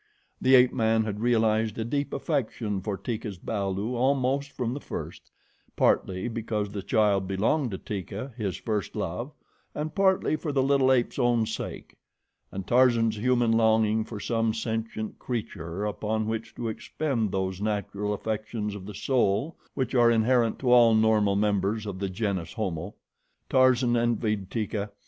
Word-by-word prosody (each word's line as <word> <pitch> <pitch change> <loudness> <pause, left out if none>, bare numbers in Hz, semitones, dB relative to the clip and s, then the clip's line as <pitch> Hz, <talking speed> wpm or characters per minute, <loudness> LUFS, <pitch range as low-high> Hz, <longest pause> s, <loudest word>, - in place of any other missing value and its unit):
The 130 +1 +6
ape 125 0 +6
man 110 -2 +2
had 105 -1 -4
realized 110 -2 +2
a 110 - -2
deep 140 +4 -2
affection 115 - -2
for 100 0 -3
Teeka's 110 -4 -4
balu 100 +3 -2
almost 135 +2 +1
from 120 -3 -2
the 140 - -4
first, - - -7 0.5
partly 95 +2 +1
because 110 -3 -3
the 100 -1 -4
child 105 -4 +2
belonged 110 +9 +1
to 95 - -4
Teeka, 105 +8 -6
his 105 -6 -3
first 105 -4 -3
love, - - -3 0.4
and 155 +1 -3
partly 190 -3 +2
for 155 0 -3
the 135 -2 +2
little 135 -1 +3
ape's 125 -2 +1
own 120 -2 +3
sake, - - -6 0.5
and 95 -1 -5
Tarzan's 115 -2 +3
human 120 0 +2
longing 110 -1 +3
for 110 -1 -7
some 115 0 0
sentient 110 -1 -4
creature 100 -6 -4
upon 110 +1 -2
which 110 0 -4
to 120 - -4
expend 115 -1 -2
those 95 0 -2
natural 105 -1 -2
affections 110 0 -3
of 100 -1 -8
the 105 - -7
soul 130 - +1 0.2
which 130 -1 -2
are 120 -2 +5
inherent 115 0 +3
to 125 -2 0
all 120 -2 +7
normal 110 -2 +3
members 105 +1 0
of 100 -3 -5
the 100 -1 -2
GENUS 95 -3 -2
HOMO. 95 -5 -4 0.6
Tarzan 130 -2 +4
envied 110 -4 0
Teeka. 105 -2 -2
110 Hz, 155 wpm, -27 LUFS, 105-120 Hz, 0.6 s, all